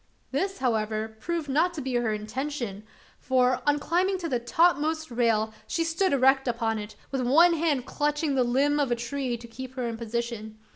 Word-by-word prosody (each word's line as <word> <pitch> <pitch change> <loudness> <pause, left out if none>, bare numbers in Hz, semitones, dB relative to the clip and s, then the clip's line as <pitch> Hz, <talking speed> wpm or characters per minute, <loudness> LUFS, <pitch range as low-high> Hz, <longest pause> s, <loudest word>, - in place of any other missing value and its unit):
This, 380 +9 -1
however, 220 -3 -1
proved 335 +4 -3
not 330 +6 +2
to 300 - -4
be 260 -1 -3
her 240 -2 +1
intention; 215 0 -4 0.4
for, 255 -1 +2
on 290 0 +4
climbing 365 +6 +1
to 350 -2 -4
the 255 -6 0
topmost 315 +3 +1
rail, 225 -2 +1
she 335 - 0
stood 330 +3 +1
erect 270 0 +4
upon 230 -2 0
it, 210 0 -8 0.2
with 270 -1 -1
one 320 +8 +5
hand 305 -6 0
clutching 295 0 0
the 260 -2 +3
limb 275 +5 +2
of 280 -3 +1
a - - +3
tree, 240 +1 -3
to 235 0 -11
keep 260 +2 -9
her 250 -2 -2
in 230 -1 -4
position. 230 -1 -4
260 Hz, 190 wpm, -27 LUFS, 235-295 Hz, 0.4 s, one